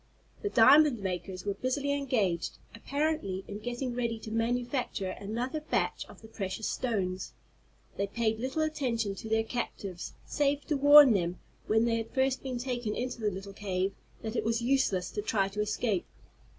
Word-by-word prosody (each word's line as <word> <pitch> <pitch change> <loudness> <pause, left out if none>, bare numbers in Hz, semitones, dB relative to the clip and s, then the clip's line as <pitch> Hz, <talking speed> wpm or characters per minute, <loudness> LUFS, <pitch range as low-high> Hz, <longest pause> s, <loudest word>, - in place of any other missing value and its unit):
The 410 - -1
diamond 280 - +7
makers 185 0 -4
were 200 - 0
busily 265 +6 -1
engaged, 230 - 0 0.2
apparently 275 -6 -1
in 205 0 -6
getting 245 +3 -3
ready 235 -2 -1
to 220 - -7
manufacture 240 -3 -1
another 235 +10 -3
batch 305 - -1
of - - -15
the - - -10
precious 205 0 -4
stones. 190 -7 -2 0.6
They 200 - 0
paid 220 +1 0
little 265 +6 -1
attention 240 -9 -1
to 220 +3 -8
their 220 0 +2
captives, 200 -6 -5
save 290 0 0
to 300 - +2
warn 285 -2 +9
them, 175 -2 0 0.3
when 220 +1 +3
they 230 -1 +2
had 225 0 -4
first 265 0 +2
been 260 -2 -3
taken 240 -3 -2
into 250 -1 -3
the 210 - +2
little 195 +1 -7
cave, 195 -1 -1 0.3
that 220 +1 -4
it - - 0
was 230 +1 +1
useless 235 -7 +1
to 210 - -3
try 200 -2 +1
to 210 +2 -3
escape. 210 -2 -1
230 Hz, 170 wpm, -30 LUFS, 200-260 Hz, 0.6 s, warn